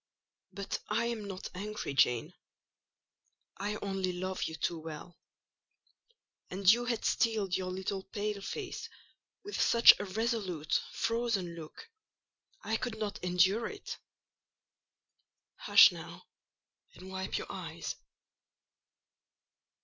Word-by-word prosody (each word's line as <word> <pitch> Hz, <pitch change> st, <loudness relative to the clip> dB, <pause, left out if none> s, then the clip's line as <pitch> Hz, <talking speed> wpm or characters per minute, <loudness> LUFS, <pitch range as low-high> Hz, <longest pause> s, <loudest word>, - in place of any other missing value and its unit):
"But 200 Hz, -1 st, -4 dB
I 225 Hz, +2 st, +1 dB
am 230 Hz, -3 st, -3 dB
not 190 Hz, -1 st, -6 dB
angry, 205 Hz, -5 st, -4 dB
Jane: 125 Hz, -4 st, +2 dB, 1.2 s
I 205 Hz, +2 st, -2 dB
only 195 Hz, -2 st, -1 dB
love 185 Hz, +1 st, -4 dB
you 160 Hz, -, -4 dB
too 165 Hz, +1 st, -2 dB
well; 160 Hz, +2 st, -9 dB, 1.3 s
and 190 Hz, +1 st, -5 dB
you 240 Hz, +1 st, -1 dB
had 240 Hz, -2 st, -1 dB
steeled 215 Hz, -5 st, +1 dB
your 185 Hz, -1 st, -2 dB
little 190 Hz, +1 st, -3 dB
pale 205 Hz, 0 st, -3 dB
face 385 Hz, -, -5 dB, 0.5 s
with 410 Hz, +1 st, -3 dB
such 235 Hz, 0 st, +9 dB
a 205 Hz, -, -3 dB
resolute, 195 Hz, -, -1 dB
frozen 230 Hz, -7 st, -1 dB
look, 165 Hz, -, -10 dB, 0.8 s
I 220 Hz, +2 st, 0 dB
could 240 Hz, -2 st, -4 dB
not 210 Hz, -4 st, -4 dB
endure 180 Hz, +5 st, +3 dB
it. 415 Hz, -, -7 dB, 1.6 s
Hush, -, -, +8 dB
now, -, -, -9 dB, 0.7 s
and 185 Hz, +1 st, -11 dB
wipe 190 Hz, 0 st, -2 dB
your -, -, -5 dB
eyes." -, -, -5 dB
200 Hz, 110 wpm, -32 LUFS, 185-225 Hz, 1.6 s, such